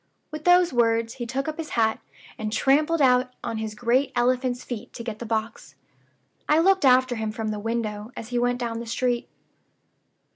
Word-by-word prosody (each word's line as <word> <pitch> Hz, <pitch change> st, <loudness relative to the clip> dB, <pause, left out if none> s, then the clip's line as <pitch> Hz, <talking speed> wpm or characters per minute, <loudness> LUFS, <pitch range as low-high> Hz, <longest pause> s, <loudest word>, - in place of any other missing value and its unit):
With 305 Hz, 0 st, -7 dB
those 355 Hz, -3 st, +5 dB
words 230 Hz, -1 st, +2 dB
he 240 Hz, -, -3 dB
took 270 Hz, +4 st, -3 dB
up 310 Hz, +1 st, -4 dB
his 320 Hz, -, -5 dB
hat, 220 Hz, -1 st, +2 dB, 0.4 s
and 215 Hz, -1 st, -4 dB
trampled 300 Hz, +6 st, +2 dB
out 250 Hz, 0 st, +3 dB
on 230 Hz, -1 st, -3 dB
his 220 Hz, -1 st, -4 dB
great 245 Hz, +4 st, +1 dB
elephant's 250 Hz, 0 st, +1 dB
feet 245 Hz, 0 st, -7 dB
to 235 Hz, -, -7 dB
get 225 Hz, -2 st, -6 dB
the 235 Hz, -, -6 dB
box. 220 Hz, 0 st, -4 dB, 0.7 s
I 300 Hz, -, +5 dB
looked 380 Hz, 0 st, +4 dB
after 255 Hz, -1 st, +4 dB
him 220 Hz, -1 st, -2 dB
from 220 Hz, 0 st, -4 dB
the 210 Hz, -1 st, -3 dB
window 220 Hz, 0 st, -3 dB
as 225 Hz, -, -7 dB
he 245 Hz, -1 st, 0 dB
went 245 Hz, 0 st, +1 dB
down 235 Hz, -2 st, -3 dB
the 235 Hz, -, -7 dB
street. 240 Hz, +1 st, -1 dB
240 Hz, 190 wpm, -25 LUFS, 225-260 Hz, 0.7 s, those